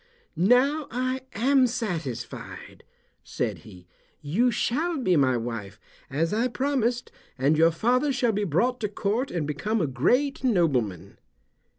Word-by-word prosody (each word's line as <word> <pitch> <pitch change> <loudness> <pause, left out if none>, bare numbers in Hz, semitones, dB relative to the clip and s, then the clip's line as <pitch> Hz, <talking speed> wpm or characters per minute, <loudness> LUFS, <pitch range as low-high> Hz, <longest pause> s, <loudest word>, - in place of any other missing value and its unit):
"Now 255 - +3
I 255 +2 -2
am 260 +4 +3
satisfied," 170 - -5 0.4
said - - -3
he. 90 -1 -14 0.3
"You 190 +13 +1
shall 305 +9 -1
be 190 -10 +2
my 130 -4 +3
wife, 115 -4 -6 0.3
as 160 +6 -1
I 230 +4 +1
promised, 250 -2 -1 0.3
and 140 +4 +2
your 165 +2 +5
father 245 - +1
shall 245 -3 +1
be 210 0 -1
brought 230 - +1
to 210 - -2
court 215 +6 -1
and 170 - -2
become 150 +10 -2
a 165 - +1
great 250 - +1
nobleman." 125 - 0
210 Hz, 135 wpm, -26 LUFS, -, 0.4 s, your